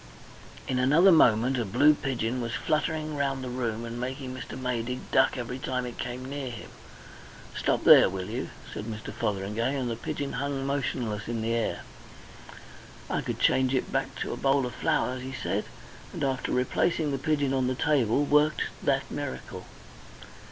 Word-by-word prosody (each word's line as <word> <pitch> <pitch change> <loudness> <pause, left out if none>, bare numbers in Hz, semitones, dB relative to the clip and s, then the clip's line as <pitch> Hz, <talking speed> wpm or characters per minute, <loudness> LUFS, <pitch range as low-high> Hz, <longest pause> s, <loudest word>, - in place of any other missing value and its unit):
In 125 - 0
another 150 +9 +6
moment 125 -4 +4
a - - +1
blue 125 +9 +5
pigeon 125 -4 -2
was 120 0 -3
fluttering 155 0 -1
round 135 -2 -1
the 125 - -4
room 120 -2 -2
and 115 +1 -6
making 130 +1 -4
Mr. 130 0 -7
Maydig 125 0 -2
duck 130 0 +4
every 125 +1 -4
time 125 -1 -2
it 120 - -8
came 125 +1 -4
near 135 -1 -4
him. 115 -3 -9 0.8
"Stop - - 0
there, - - +8
will 95 -1 -4
you?" 120 +4 -4 0.2
said 105 - -5
Mr. 110 -1 -6
Fotheringay; 105 +6 -1
and 125 -3 -1
the - - -2
pigeon 140 +4 -4
hung 135 +1 -2
motionless 120 -6 -2
in 115 -1 -2
the 115 +1 0
air. 115 -1 -1 1.3
"I - - 0
could - - -4
change 130 0 +3
it 130 - -1
back - - -1
to - - -2
a - - -5
bowl 135 -1 +2
of 125 - -5
flowers," 125 0 0
he 130 +1 -6
said, - - -1 0.5
and - - -4
after 135 -2 -1
replacing 145 +4 +1
the 135 - -2
pigeon 145 -2 +1
on 130 -1 +1
the 130 - 0
table 135 -2 +2
worked 150 +1 +3 0.2
that - - +1
miracle. 65 - -6
130 Hz, 175 wpm, -28 LUFS, 120-140 Hz, 1.3 s, there